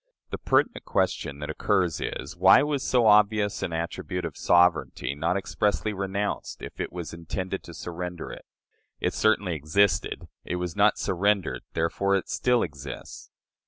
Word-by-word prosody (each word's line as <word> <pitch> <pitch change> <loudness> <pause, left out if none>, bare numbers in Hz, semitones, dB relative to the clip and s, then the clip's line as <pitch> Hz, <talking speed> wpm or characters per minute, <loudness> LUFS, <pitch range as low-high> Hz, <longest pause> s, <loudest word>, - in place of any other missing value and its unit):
The - - -4
pertinent 240 - +1
question 95 -7 -1
that 75 - -3
occurs 95 -6 0
is, 70 +5 -4
Why 95 +9 +6
was 145 -2 -1
so 125 -3 +2
obvious 105 -1 +4
an - - -2
attribute 85 +2 -3
of 80 - -5
sovereignty 85 -5 +2
not 85 +6 0
expressly 105 +2 -1
renounced 100 +1 -3
if - - -9
it - - -4
was 85 -2 -6
intended 90 +3 -4
to 85 - -10
surrender 90 +1 -6
it? - - -10 0.5
It - - 0
certainly 105 -4 +2
existed; 80 +7 +1 0.2
it - - -3
was 90 -1 -3
not 105 +1 +4
surrendered; 100 +2 0
therefore 100 +4 +1
it 95 - -2
still 125 -1 +2
exists. 70 -5 -8
95 Hz, 155 wpm, -26 LUFS, 85-105 Hz, 0.5 s, Why